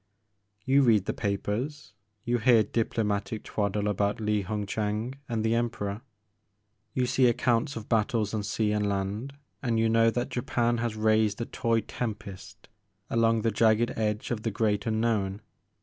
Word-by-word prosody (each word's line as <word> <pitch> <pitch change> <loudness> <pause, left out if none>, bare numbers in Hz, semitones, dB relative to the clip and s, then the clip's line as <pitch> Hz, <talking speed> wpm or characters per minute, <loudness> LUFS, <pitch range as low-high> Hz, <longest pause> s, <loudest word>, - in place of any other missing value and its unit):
You 135 +2 +4
read 110 -7 +4
the - - -1
papers, 105 +7 -3 0.3
you 120 0 0
hear 115 -2 +5
diplomatic 105 -2 -1
twaddle 105 0 -1
about 100 0 0
I^i 105 -2 0
Hung 105 +1 -3
Chang 105 +4 -2 0.2
and 115 -2 -1
the 110 - +2
Emperor, 115 -3 -2 0.9
you 125 - +2
see 125 +1 +3
accounts 120 +4 +1
of 115 -1 -7
battles 110 -2 +1
on 110 - 0
sea 105 +1 0
and 105 -1 0
land, 100 +7 -3 0.3
and 115 -4 0
you 115 0 +3
know 115 0 +4
that 120 +2 -2
Japan 120 -1 0
has 115 -2 -2
raised 110 -1 +2
a 115 - -2
toy 115 -1 0
tempest 105 -3 -7 0.4
along 115 -1 +2
the 115 - +2
jagged 110 +2 +3
edge 110 +2 -1
of 115 -3 -2
the 115 - -1
great 105 0 0
unknown. 110 -3 0
110 Hz, 160 wpm, -28 LUFS, 105-115 Hz, 0.9 s, hear